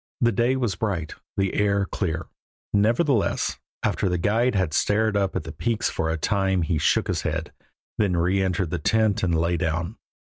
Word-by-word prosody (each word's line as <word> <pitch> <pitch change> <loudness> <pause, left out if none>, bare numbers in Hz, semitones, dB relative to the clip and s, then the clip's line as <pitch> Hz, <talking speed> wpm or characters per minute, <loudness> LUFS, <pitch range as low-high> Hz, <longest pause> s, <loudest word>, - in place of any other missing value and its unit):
The 120 -1 +3
day 120 +5 +2
was 120 -6 0
bright, 90 -5 -2 0.2
the 95 -1 +1
air 100 -1 +2
clear, 85 -4 -3 0.5
nevertheless 115 +4 +2 0.2
after 95 - +1
the 90 - 0
guide 110 +7 +1
had 95 -6 0
stared 110 +4 +2
up 100 -1 0
at - - -1
the 80 - -7
peaks 105 +10 -1
for 80 - -1
a 80 - 0
time 95 +1 +1
he 80 -1 0
shook - - +2
his - - -1
head, - - -3 0.5
then 100 -4 +2
reëntered 90 0 +1
the 90 - -1
tent 110 -3 +2
and 85 -3 +1
lay 85 +1 +1
down. 85 0 -2
95 Hz, 180 wpm, -24 LUFS, 85-105 Hz, 0.5 s, The